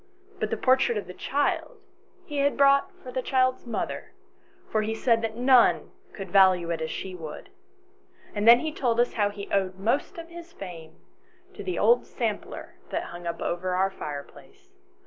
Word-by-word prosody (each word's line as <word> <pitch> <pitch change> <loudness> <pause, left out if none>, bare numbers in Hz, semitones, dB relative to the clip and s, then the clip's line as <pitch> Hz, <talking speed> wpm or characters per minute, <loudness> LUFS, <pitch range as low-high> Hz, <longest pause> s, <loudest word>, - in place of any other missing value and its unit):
But - - -1
the - - -1
portrait 255 -3 +3
of 205 - -3
the 180 - -9
child 285 +9 -1 0.5
he 295 - -6
had 280 0 +2
brought 275 0 +4
for 255 - -8
the 255 +1 -2
child's 255 -1 +1
mother, 230 - -4 0.6
for 215 - +2
he 220 +1 -2
said 225 -1 +1
none 250 0 +4 0.2
could 195 -3 -8
value 185 -3 +5
it 165 - -2
as 160 - -2
she 190 - -5
would. 160 -4 -9 0.8
And 210 +1 -1
then 235 +1 +9
he 315 - -2
told 240 -6 0
us 245 - +2
how 205 -2 +1
he 205 0 -8
owed 190 -2 +1
most 235 - -1
of 335 0 -8
his 340 0 -11
fame 165 -4 -9 0.6
to - - -8
the 365 - -3
old 475 - +4
sampler - - -4
that - - -3
hung 175 0 -7
up 170 0 -3
over 180 +1 -1
our 190 +1 +2
fireplace. 195 - -9
225 Hz, 180 wpm, -26 LUFS, 185-270 Hz, 0.8 s, then